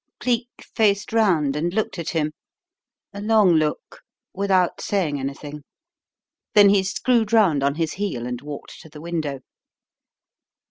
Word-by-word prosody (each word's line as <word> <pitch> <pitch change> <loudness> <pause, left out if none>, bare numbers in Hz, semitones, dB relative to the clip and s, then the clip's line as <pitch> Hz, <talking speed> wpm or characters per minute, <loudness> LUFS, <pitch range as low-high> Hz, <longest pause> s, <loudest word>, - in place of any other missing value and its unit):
Cleek 240 -1 -1 0.3
faced 205 -1 +1
round 170 -11 +2
and 165 +4 -1
looked 220 -4 -1
at 165 - -4
him 155 -2 -1 0.8
a 200 - -7
long 210 -3 +4
look 155 -2 -1 0.3
without 190 -2 +1
saying 165 -8 -1
anything, 145 +2 -6 0.9
then 205 -1 +8
he 200 -1 +4
screwed 220 +3 0
round 195 -11 +4
on 140 +1 +1
his 165 -1 -2
heel 180 -12 -3
and 125 -1 -5
walked 145 -1 -9
to 160 - -14
the 150 - -12
window. 155 -5 -4
170 Hz, 140 wpm, -22 LUFS, 150-205 Hz, 0.9 s, then